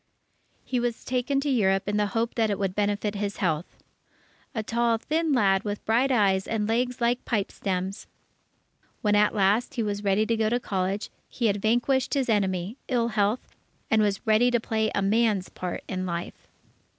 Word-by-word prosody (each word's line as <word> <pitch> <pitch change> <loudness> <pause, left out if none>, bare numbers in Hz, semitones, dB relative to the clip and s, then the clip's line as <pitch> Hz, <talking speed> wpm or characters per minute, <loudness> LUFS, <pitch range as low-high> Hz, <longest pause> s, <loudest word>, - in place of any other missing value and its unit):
He 250 - -1
was 240 -1 -3
taken 255 +2 0
to 290 - -1
Europe, 195 -5 +2
in 205 0 0
the 210 0 +2
hope 230 +1 0
that 225 -2 +1
it 200 - 0
would 195 -2 -1
benefit 205 +1 0
his 205 0 -3
health, 165 -4 -2 0.8
"a 220 - -1
tall 235 +1 +1
thin 315 +6 -1
lad 200 -6 +3
with 205 -1 -4
bright 245 +5 +2
eyes 195 -5 +2
and 215 -2 -1
legs 245 +3 0
like 240 +1 +1
pipestems." 195 -3 -2 1.0
When 210 -1 +3
at 210 +1 +3
last, 205 +4 +2
he 235 - 0
was 205 -1 -3
ready 200 +2 +2
to 230 - +1
go 220 -1 +1
to 240 +2 +1
college, 195 -2 -2 0.2
he 240 - -3
had 205 -2 +1
vanquished 245 +5 +1
his 270 -3 0
enemy, 195 0 0
ill 240 -3 +1
health, 210 +2 0 0.4
and 220 -1 +4
was 205 +1 0
ready 220 +2 +4
to 240 -1 +2
play 220 -1 0
a 200 - +1
man's 210 -2 +2
part 180 -1 -5
in 185 -1 -3
life. 170 0 -5
215 Hz, 185 wpm, -26 LUFS, 200-235 Hz, 1.0 s, and